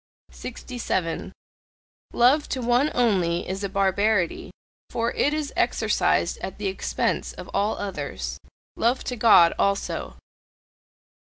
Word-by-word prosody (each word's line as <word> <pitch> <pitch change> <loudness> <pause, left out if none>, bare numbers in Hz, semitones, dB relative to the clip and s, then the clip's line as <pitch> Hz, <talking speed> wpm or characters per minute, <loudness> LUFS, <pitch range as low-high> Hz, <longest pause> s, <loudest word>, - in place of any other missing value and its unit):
67. 230 -9 -4 0.8
Love 265 +5 +3
to 260 - -2
one 245 +4 +2
only 185 -8 +1
is 190 +2 -4
a 200 - -1
barbarity, 195 -1 +1 0.4
for 230 0 -1
it 290 - +1
is 305 -1 -3
exercised - - +1
at - - -6
the - - -5
expense 385 - -1
of - - -10
all 210 +2 0
others. 200 -2 -5 0.4
Love 240 +3 +1
to 250 - -3
God 210 -7 +6
also! 200 0 -1
220 Hz, 115 wpm, -24 LUFS, 195-250 Hz, 0.8 s, God